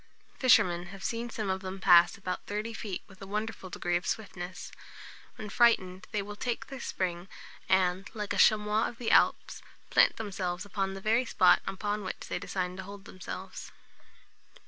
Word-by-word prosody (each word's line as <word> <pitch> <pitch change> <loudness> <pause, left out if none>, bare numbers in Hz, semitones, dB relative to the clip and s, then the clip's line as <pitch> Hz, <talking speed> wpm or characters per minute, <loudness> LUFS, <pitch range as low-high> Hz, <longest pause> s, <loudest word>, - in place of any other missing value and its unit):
Fishermen 180 -9 +4
have 195 +1 -10
seen 235 0 -2
some 215 -4 -2
of 190 0 -2
them 190 0 -6
pass 175 -1 +6
about 185 -2 -5
thirty 210 +3 -3
feet 205 -4 -5
with 190 -1 -18
a 195 - -8
wonderful 210 -1 -4
degree 175 0 -2
of 175 - -1
swiftness. 185 -4 -5 0.6
When 215 - -7
frightened, 190 -5 +2
they 210 -2 -1
will 205 +1 -8
take 240 +2 -3
their 270 -1 -8
spring, 180 -5 -3 0.4
and, 190 0 +2
like 210 -1 -3
a - - -2
chamois 210 +1 +4
of 235 - -8
the 235 -2 -1
Alps, - - +3 0.3
plant - - +5
themselves 190 -3 -3
upon 195 -1 -2
the 195 - -8
very 225 +5 +2
spot 185 -5 +5
upon 205 +2 -2
which 185 - -6
they - - -2
designed 180 -1 -3
to 190 - -5
hold 200 +1 -10
themselves. 185 0 -8
195 Hz, 175 wpm, -30 LUFS, 185-215 Hz, 0.6 s, pass